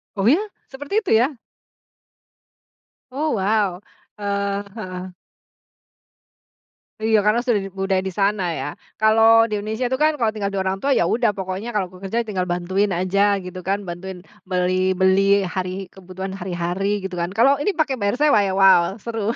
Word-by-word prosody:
Oh 195 - -2
ya? 325 - +4 0.3
Seperti 290 +11 -2
itu, - - -3
ya? 270 +5 +1 1.8
Oh! 300 +4 -1
Wow. 200 -2 0 0.4
Eee, 200 -1 -2
heeh. 185 -4 -7 1.9
Iya. 220 0 +3
Karena 215 +3 +3
sudah 240 -5 +2 0.2
budaya 195 -1 +1
di 190 - -5
sana 200 0 +1 0.2
ya? 135 - -3 0.4
Kalau 225 +1 +6
di - - -15
Indonesia 220 +4 -3
itu 260 - 0
kan, 305 +1 +4
Kalau 230 -6 0
tinggal 210 -2 -3
dengan 190 - -1
orang 190 - -3
tua, 280 - +1
ya - - +3
udah. 230 +6 +2
Pokoknya 190 +3 -4
kalau 190 -3 -1
bekerja, 195 +5 -3
tinggal 190 -5 -3
bantuin 185 +3 0
aja, 200 +2 +2
gitu 180 0 -7
kan? 200 +1 0
Bantuin 180 +2 -7 0.3
beli 185 0 +1
beli, 195 +1 +4
hari 185 0 -4
kebutuhan 190 0 -8
hari-hari, 185 +3 -2
gitu 190 -1 -5
kan, 170 0 -1
kalau 275 +5 +4
ini 305 - +1
pakai 305 -5 0
bayar 200 +1 0
sewa 290 -4 +4
ya? - - -1
Wow. 190 -1 +5
Seru. 225 -1 -2
200 Hz, 160 wpm, -21 LUFS, 185-225 Hz, 1.9 s, Kalau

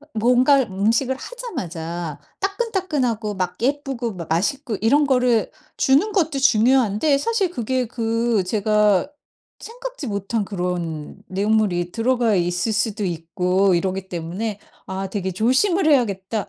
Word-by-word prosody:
어 295 - -19
뭔가 250 +5 +4
음식을 230 +5 0
하자마자 175 - -6 0.2
따끈따끈하고 320 - -1
막 180 -1 -3
예쁘고 265 -4 -1
막 170 -3 -7
맛있고 215 - -1
이런 285 +7 +3
거를 250 -3 +2 0.3
주는 295 +11 +3
것도 320 -7 +1
중요한데 255 +2 +3
사실 430 0 0
그게 255 -3 -1
그 230 -2 0
제가 210 +3 +2 0.5
생각지 - - -7
못한 200 +2 -2
그런 175 -5 -4
내용물이 195 -3 0
들어가 235 -2 +1
있을 175 +5 0
수도 215 -1 -1
있고 180 +3 +1
이러기 190 +2 -1
때문에 185 +5 -4 0.3
아 190 0 -4
되게 190 -3 -3
조심을 290 - +2
해야겠다 205 -6 0
225 Hz, 290 characters per minute, -22 LUFS, 190-270 Hz, 0.5 s, 뭔가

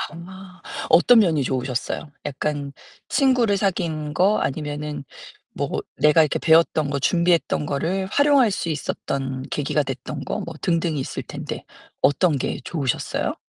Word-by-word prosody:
아. 185 +2 -11 0.3
어떤 230 +7 +7
면이 160 -8 +3
좋으셨어요? 130 +3 -3
약간 145 0 -3 0.4
친구를 255 -7 +3
사귄 165 -6 -1
거 195 +6 +3
아니면은 150 0 -3 0.5
뭐 - - -2 0.3
내가 150 +2 +5
이렇게 150 - -1
배웠던 160 -2 +3
거 140 0 -1
준비했던 170 -1 +2
거를 180 +7 -1
활용할 280 +1 +4
수 180 -4 -3
있었던 135 -3 -3
계기가 145 +1 0
됐던 135 +2 -6
거 - - -3
뭐 165 - -6
등등이 165 -3 0
있을 130 - -4
텐데 - - -6 0.4
어떤 145 +1 +3
게 - - -2
좋으셨어요? 140 -6 -2
155 Hz, 300 characters per minute, -23 LUFS, 140-185 Hz, 0.5 s, 어떤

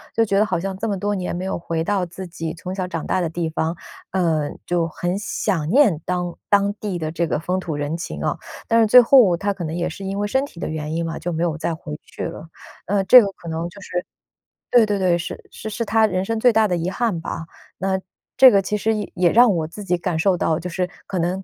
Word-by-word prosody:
就 225 - +3
觉 195 -2 +1
得 210 - +4
好 210 - -1
像 195 +2 -3
这 220 +4 -3
么 200 - -1
多 205 +2 -1
年 185 -3 -3
没 180 +2 -4
有 190 - -2
回 165 -1 -2
到 195 +1 0
自 180 +2 -7
己 165 -2 -5
从 180 +2 -6
小 185 -1 -3
长 165 -3 -4
大 185 - 0
的 170 - -1
地 165 +1 -2
方， 160 +1 -2 0.3
呃， 165 -5 0 0.2
就 175 -1 0
很 175 +3 -3
想 185 -6 -1
念 205 - +4
当 180 -1 -2
当 200 0 +3
地 205 -3 -4
的 155 -2 -3
这 170 +1 -1
个 - - 0
风 180 +3 -1
土 165 -5 -4
人 145 +2 -2
情 170 - -5
哦。 - - 0 0.3
但 230 0 +4
是 220 - +4
最 250 +4 +9
后 230 -8 +6
他 200 +2 -1
可 190 -3 -6
能 160 0 -3
也 175 0 -1
是 180 +3 -7
因 195 +1 -3
为 205 - 0
身 265 +6 +1
体 170 - -14
的 - - -3
原 155 -1 -4
因 165 0 -1
嘛， 165 - -4
就 175 - -3
没 165 0 -1
有 165 -3 0
再 165 0 -1
回 155 -2 -7
去 - - -8
了。 165 -1 -7 0.4
呃， 195 0 +1
这 250 +6 +9
个 205 - 0
可 170 - -14
能 165 +1 -3
就 200 - -14
是 180 -1 -3 0.7
对， 240 -2 +6
对， 205 -1 -1
对， 180 -2 +3
是 170 - -6
是 220 - -7
是 230 +2 -3
他 220 +1 +3
人 185 -2 -1
生 225 +2 -1
最 245 +3 +5
大 220 -1 +3
的 180 - 0
遗 170 +1 -2
憾 205 -4 -1
吧。 165 - -5 0.3
那 190 +1 0 0.4
这 260 0 +10
个 200 - +4
其 210 +2 -2
实 220 +2 +1
也 210 -2 -4
也 175 -2 +3
让 235 -2 +6
我 160 -3 -1
自 205 +6 -9
己 180 -2 0
感 175 -1 -2
受 180 +2 +2
到， 160 -2 +1
就 180 +2 -5
是 180 +1 -2 0.2
可 185 - -2
能 180 +3 -1
180 Hz, 285 characters per minute, -21 LUFS, 170-205 Hz, 0.7 s, 这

